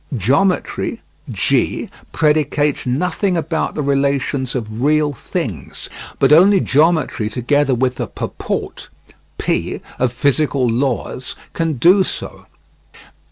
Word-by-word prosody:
Geometry 140 Hz, -, 0 dB, 0.3 s
(G) -, -, 0 dB, 0.2 s
predicates 150 Hz, -2 st, +1 dB
nothing 180 Hz, +7 st, 0 dB
about 160 Hz, 0 st, -2 dB
the 150 Hz, -, -1 dB
relations 140 Hz, -1 st, 0 dB
of 110 Hz, -2 st, -4 dB
real 150 Hz, +1 st, +2 dB
things, 115 Hz, -, -5 dB, 0.3 s
but -, -, +4 dB
only 190 Hz, +5 st, +6 dB
geometry 155 Hz, -8 st, +2 dB
together 130 Hz, +4 st, +1 dB
with 125 Hz, +1 st, 0 dB
the -, -, -3 dB
purport -, -, -5 dB, 0.5 s
(P) -, -, -1 dB, 0.2 s
of 130 Hz, -1 st, +2 dB
physical 140 Hz, +1 st, +1 dB
laws 125 Hz, +1 st, -2 dB, 0.2 s
can 165 Hz, -1 st, 0 dB
do 180 Hz, +9 st, +5 dB
so. -, -, -7 dB
140 Hz, 110 wpm, -18 LUFS, 125-160 Hz, 0.5 s, only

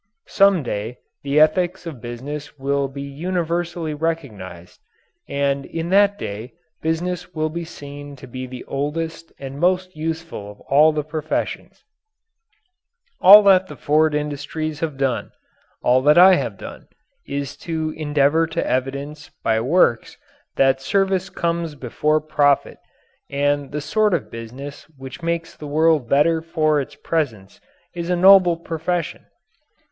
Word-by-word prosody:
Some 195 Hz, -5 st, +4 dB
day 115 Hz, 0 st, -4 dB, 0.2 s
the 140 Hz, +1 st, +1 dB
ethics 175 Hz, +4 st, +2 dB
of 150 Hz, -8 st, -7 dB
business 140 Hz, +5 st, -7 dB
will 140 Hz, 0 st, 0 dB
be 140 Hz, +1 st, -7 dB
universally 170 Hz, +2 st, -3 dB
recognized, 120 Hz, -, -5 dB, 0.5 s
and 140 Hz, 0 st, 0 dB
in 165 Hz, +4 st, -5 dB
that 200 Hz, +1 st, +4 dB
day 110 Hz, -, -6 dB, 0.3 s
business 175 Hz, +2 st, -3 dB
will 155 Hz, 0 st, 0 dB
be 170 Hz, +1 st, -4 dB
seen 145 Hz, -2 st, -10 dB
to 130 Hz, -, -12 dB
be 130 Hz, +1 st, -7 dB
the 125 Hz, 0 st, -8 dB
oldest 160 Hz, +4 st, -4 dB
and 135 Hz, 0 st, -8 dB
most 185 Hz, +2 st, +1 dB
useful 160 Hz, -8 st, -5 dB
of 105 Hz, -, -13 dB
all 150 Hz, +3 st, +4 dB
the 150 Hz, -1 st, -2 dB
professions. 155 Hz, +1 st, -4 dB, 1.4 s
All 205 Hz, +3 st, +10 dB
that 190 Hz, -2 st, +5 dB
the -, -, -9 dB
Ford 155 Hz, +1 st, +2 dB
industries 150 Hz, +1 st, -3 dB
have 155 Hz, -4 st, -3 dB
done 135 Hz, -3 st, -1 dB, 0.5 s
all 125 Hz, +1 st, +4 dB
that 150 Hz, +4 st, +4 dB
I 185 Hz, +2 st, +9 dB
have -, -, -1 dB
done -, -, -10 dB, 0.4 s
is 140 Hz, -1 st, -4 dB
to 160 Hz, -2 st, -3 dB
endeavour 150 Hz, +1 st, +2 dB
to 160 Hz, -, -3 dB
evidence 140 Hz, +3 st, -3 dB
by 110 Hz, 0 st, +2 dB
works 130 Hz, -3 st, +2 dB, 0.4 s
that 135 Hz, 0 st, +3 dB
service 190 Hz, +4 st, 0 dB
comes 170 Hz, -2 st, -2 dB
before 150 Hz, +4 st, 0 dB
profit 145 Hz, -2 st, +1 dB, 0.5 s
and 145 Hz, +1 st, 0 dB
that -, -, -18 dB
the 150 Hz, +1 st, -3 dB
sort 210 Hz, +6 st, +2 dB
of -, -, -5 dB
business 130 Hz, +7 st, -9 dB
which 135 Hz, +5 st, -9 dB
makes 170 Hz, 0 st, -3 dB
the 150 Hz, -, -9 dB
world 155 Hz, -3 st, +2 dB
better 160 Hz, +3 st, +3 dB
for 155 Hz, -2 st, +1 dB
its 135 Hz, -, -9 dB
presence 115 Hz, -12 st, -3 dB, 0.3 s
is 170 Hz, 0 st, -5 dB
a 180 Hz, -, +2 dB
noble 185 Hz, -1 st, +6 dB
profession. 170 Hz, +1 st, -3 dB
150 Hz, 140 wpm, -21 LUFS, 140-170 Hz, 1.4 s, All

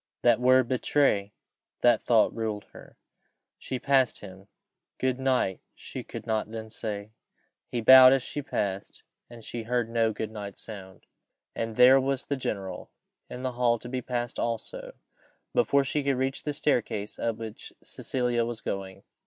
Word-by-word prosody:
That 120 Hz, -2 st, +5 dB
word 130 Hz, 0 st, +4 dB
betray 125 Hz, -5 st, +1 dB, 0.5 s
that 120 Hz, -3 st, +4 dB
thought 115 Hz, -3 st, +3 dB
ruled 110 Hz, -2 st, -3 dB
her. -, -, -15 dB, 0.6 s
She 130 Hz, -, -4 dB
passed 135 Hz, -2 st, +2 dB
him: 95 Hz, -1 st, -12 dB, 0.5 s
"Good 130 Hz, 0 st, -1 dB
night" 130 Hz, -8 st, +1 dB, 0.2 s
she -, -, -8 dB
could 115 Hz, -2 st, -8 dB
not 110 Hz, -2 st, -1 dB
then 110 Hz, -1 st, -7 dB
say. 105 Hz, -2 st, -5 dB, 0.6 s
He 120 Hz, -, -3 dB
bowed 130 Hz, +2 st, +9 dB
as 135 Hz, -2 st, +2 dB
she 145 Hz, -, -5 dB
passed, 100 Hz, -7 st, -4 dB, 0.3 s
and 120 Hz, -2 st, -12 dB
she 120 Hz, -, -5 dB
heard 120 Hz, 0 st, -1 dB
no 115 Hz, -1 st, +2 dB
"Good 110 Hz, 0 st, -5 dB
night" 100 Hz, -2 st, -7 dB
no 110 Hz, -, -7 dB
sound. 95 Hz, -3 st, -12 dB, 0.5 s
And 115 Hz, -1 st, -3 dB
there 130 Hz, +3 st, +7 dB
was 135 Hz, 0 st, -1 dB
the 140 Hz, -, -1 dB
general 100 Hz, -7 st, -5 dB, 0.4 s
in 125 Hz, -, -7 dB
the 130 Hz, -, -1 dB
hall 120 Hz, -1 st, +2 dB
to 120 Hz, -, -10 dB
be 130 Hz, 0 st, -3 dB
passed 120 Hz, -1 st, -3 dB
also, -, -, -4 dB, 0.6 s
before 140 Hz, -, +3 dB
she 145 Hz, +2 st, -1 dB
could 140 Hz, -2 st, +1 dB
reach 135 Hz, +1 st, -2 dB
the 150 Hz, -, -1 dB
staircase 115 Hz, -8 st, -1 dB
up 115 Hz, -1 st, -1 dB
which 110 Hz, -1 st, -8 dB
Cecilia 125 Hz, -2 st, -1 dB
was 115 Hz, -1 st, -4 dB
going. 95 Hz, -3 st, -5 dB
120 Hz, 165 wpm, -27 LUFS, 110-130 Hz, 0.6 s, bowed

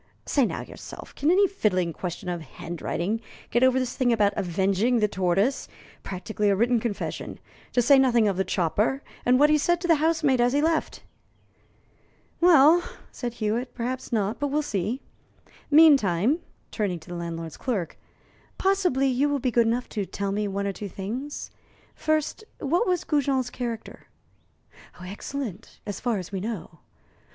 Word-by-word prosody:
Say 275 Hz, -5 st, +2 dB
now -, -, -4 dB
yourself, -, -, -11 dB
can 295 Hz, -, 0 dB
any 390 Hz, +3 st, +5 dB
fiddling 185 Hz, -, 0 dB
question 180 Hz, +1 st, -6 dB
of 175 Hz, -1 st, -3 dB
handwriting 175 Hz, -, -4 dB, 0.3 s
get 240 Hz, -, +2 dB
over 260 Hz, 0 st, +5 dB
this 255 Hz, -1 st, -1 dB
thing 250 Hz, -2 st, +2 dB
about 210 Hz, -3 st, +3 dB
'avenging 195 Hz, +5 st, +1 dB
the 210 Hz, -2 st, +3 dB
tortoise' 195 Hz, +7 st, 0 dB, 0.3 s
practically 205 Hz, +2 st, -2 dB
a 200 Hz, -, +3 dB
written 235 Hz, +3 st, +2 dB
confession 220 Hz, -3 st, -4 dB, 0.3 s
to 245 Hz, -, +3 dB
say 275 Hz, +3 st, +6 dB
nothing 240 Hz, -4 st, +4 dB
of 200 Hz, -, +1 dB
the 190 Hz, -, +1 dB
chopper, 205 Hz, -, 0 dB, 0.2 s
and 250 Hz, +1 st, +5 dB
what 295 Hz, +1 st, +5 dB
he 305 Hz, -, +4 dB
said 345 Hz, +4 st, +2 dB
to 350 Hz, -, -2 dB
the 330 Hz, -2 st, +5 dB
housemaid 310 Hz, -6 st, +2 dB
as 245 Hz, +1 st, +3 dB
he 285 Hz, -, +3 dB
left?" 320 Hz, +1 st, 0 dB, 1.4 s
"Well," 335 Hz, -1 st, +6 dB, 0.3 s
said 240 Hz, -2 st, -5 dB
Hewitt, 235 Hz, +3 st, -2 dB
"perhaps 250 Hz, +2 st, -4 dB
not; 215 Hz, -1 st, 0 dB
but 290 Hz, -, 0 dB
we'll 295 Hz, +2 st, 0 dB
see. 215 Hz, +1 st, -2 dB, 0.7 s
Meantime" 280 Hz, -, +5 dB, 0.3 s
turning 195 Hz, -5 st, -2 dB
to 160 Hz, -, -15 dB
the 175 Hz, -, -5 dB
landlord's 165 Hz, -1 st, -5 dB
clerk 200 Hz, -, -3 dB, 0.6 s
"possibly 375 Hz, -9 st, +2 dB
you 265 Hz, +3 st, +2 dB
will 285 Hz, -, +1 dB
be 255 Hz, -2 st, -1 dB
good 235 Hz, -1 st, +3 dB
enough 240 Hz, +2 st, 0 dB
to 205 Hz, -4 st, -3 dB
tell 200 Hz, 0 st, -3 dB
me 210 Hz, +1 st, -1 dB
one 200 Hz, 0 st, -2 dB
or 200 Hz, -, -1 dB
two 205 Hz, +1 st, -6 dB
things. 240 Hz, +11 st, -5 dB, 0.4 s
First, 310 Hz, +6 st, -1 dB, 0.2 s
what 340 Hz, -, +1 dB
was 360 Hz, -2 st, +1 dB
Goujon's 270 Hz, -4 st, 0 dB
character?" 235 Hz, -3 st, -6 dB, 0.9 s
"Excellent, 205 Hz, +3 st, -6 dB
as 205 Hz, -, -5 dB
far 240 Hz, -4 st, 0 dB
as 185 Hz, 0 st, -6 dB
we 195 Hz, -, -3 dB
know. 190 Hz, -6 st, -6 dB
235 Hz, 165 wpm, -26 LUFS, 195-280 Hz, 1.4 s, say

